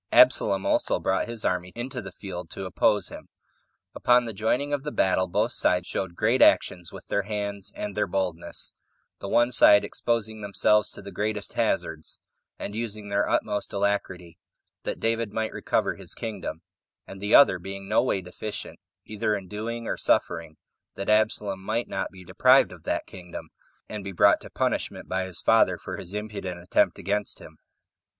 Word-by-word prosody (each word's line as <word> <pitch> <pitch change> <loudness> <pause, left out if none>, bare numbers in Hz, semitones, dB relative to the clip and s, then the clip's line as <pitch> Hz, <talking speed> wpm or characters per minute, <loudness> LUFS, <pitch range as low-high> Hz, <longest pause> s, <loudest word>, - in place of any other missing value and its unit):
Absalom 95 -1 +5
also - - +1
brought - - 0
his 115 -2 -3
army 90 0 0
into 120 +1 -4
the 95 -2 -8
field 90 -3 -7
to 95 - -6
oppose 95 - +2
him. - - -11 0.6
Upon 125 0 +4
the 115 - -5
joining 125 +8 0
of 145 - 0
the 150 +1 -4
battle, 95 -4 +2
both 105 +6 +1
sides 90 -5 +2
showed 90 -1 -4
great 115 +7 +2
actions 90 -1 +4
with - - -10
their 100 - 0
hands 100 -1 -3
and 105 -1 -5
their 105 0 +1
boldness; 90 -2 -3 0.5
the - - -6
one 120 +3 +3
side 105 -3 +7
exposing 110 -2 -2
themselves 105 +1 +2
to - - -10
the 100 - -8
greatest 105 0 -2
hazards, - - -1 0.4
and 100 - -6
using 110 -2 -4
their 100 0 +1
utmost 105 0 -1
alacrity, 95 -4 -2 0.5
that - - -3
David 115 -1 -1
might 110 -1 -2
recover - - 0
his - - -6
kingdom; 95 -8 -5 0.4
and 95 0 -10
the 105 +1 +3
other 140 - +7
being 95 +2 -7
no - - +3
way 95 - 0
deficient, 95 +4 -7 0.3
either 105 0 -1
in 95 -2 -6
doing 115 +4 -5
or - - -2
suffering, 80 -2 0 0.4
that 100 - -1
Absalom 105 -2 +1
might 110 +4 -2
not - - -3
be 95 -1 -13
deprived 130 +9 +5
of 90 -3 -13
that - - -1
kingdom, 90 -2 -9 0.4
and 105 -2 -6
be 100 - -5
brought 90 - +4
to - - -10
punishment - - -2
by 95 0 -1
his 95 -3 -7
father - - +4
for - - -7
his 85 - -7
impudent 105 -4 -5
attempt 90 - +2
against 100 +3 -2
him. - - -14
100 Hz, 175 wpm, -26 LUFS, 95-110 Hz, 0.6 s, side